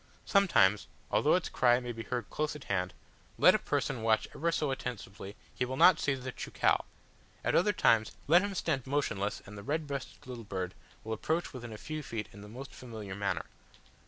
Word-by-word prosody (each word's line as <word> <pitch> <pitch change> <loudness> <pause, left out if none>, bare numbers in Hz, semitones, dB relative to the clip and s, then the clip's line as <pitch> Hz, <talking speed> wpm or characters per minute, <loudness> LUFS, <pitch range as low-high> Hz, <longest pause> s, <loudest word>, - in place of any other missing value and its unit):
Sometimes, 140 - +4 0.2
although - - +4
its - - 0
cry 120 -1 +4
may 125 -1 -5
be 115 -1 -6
heard 120 +1 -3
close 150 0 -1
at 150 - -8
hand, 90 -2 -1 0.4
let - - +7
a - - +2
person 120 - -1
watch 110 -1 +2
ever 170 +3 0
so 150 -3 0
attentively 100 -6 -6 0.2
he - - -1
will 130 +1 -3
not 180 +1 +7
see 140 - +1
the 130 0 -5
cheucau; - - +1 0.6
at - - +1
other 205 +4 +4
times, 115 - +3
let 170 +5 +6
him 200 -1 -3
stand 140 -8 -1
motionless 110 -8 -1
and 105 0 -9
the - - -9
red 155 +5 -1
breasted 140 -2 -6
little 125 -2 -7
bird 95 -3 -4 0.3
will 110 - -3
approach 160 +10 -1
within 120 -3 -7
a 110 - -7
few 155 +6 -5
feet 115 -6 -4
in 100 - -11
the 105 - -10
most 130 +6 -9
familiar 110 -6 -7
manner. 100 0 -1
125 Hz, 200 wpm, -32 LUFS, 105-145 Hz, 0.6 s, let